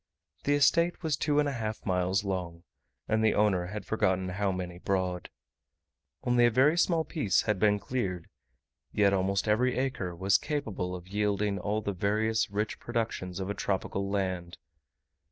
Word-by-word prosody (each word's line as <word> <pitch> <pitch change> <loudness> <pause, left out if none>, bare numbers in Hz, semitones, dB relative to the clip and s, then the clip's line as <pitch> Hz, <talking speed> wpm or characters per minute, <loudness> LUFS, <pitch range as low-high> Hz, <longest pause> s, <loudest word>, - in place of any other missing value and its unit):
The 145 - +3
estate 170 +5 +3
was 155 -3 +1
two 145 +1 0
and 150 0 +3
a - - 0
half 110 -4 -4
miles 95 +2 +1
long, 90 -4 -4 0.4
and 110 0 +1
the 110 - +3
owner 95 -4 +2
had 105 +3 -6
forgotten 95 -4 0
how 100 +1 0
many 90 -1 -5
broad. 90 -2 -1 0.9
Only 120 -1 +4
a - - +4
very 135 +7 +4
small 170 -2 +2
piece 125 - +1
had 105 -3 0
been 105 0 +4
cleared, 95 -7 -3 0.6
yet 100 -1 +3
almost 95 +2 +1
every 125 +4 +2
acre 125 -10 -2
was 95 +3 +3
capable 110 - -3
of 90 0 -9
yielding 105 0 0
all 105 +3 -1
the 100 - -2
various 110 +4 +1
rich 105 +2 -2
productions 110 -6 -3
of 95 +1 -2
a - - -1
tropical 100 0 -2
land. 95 -3 -2
100 Hz, 165 wpm, -29 LUFS, 95-115 Hz, 0.9 s, Only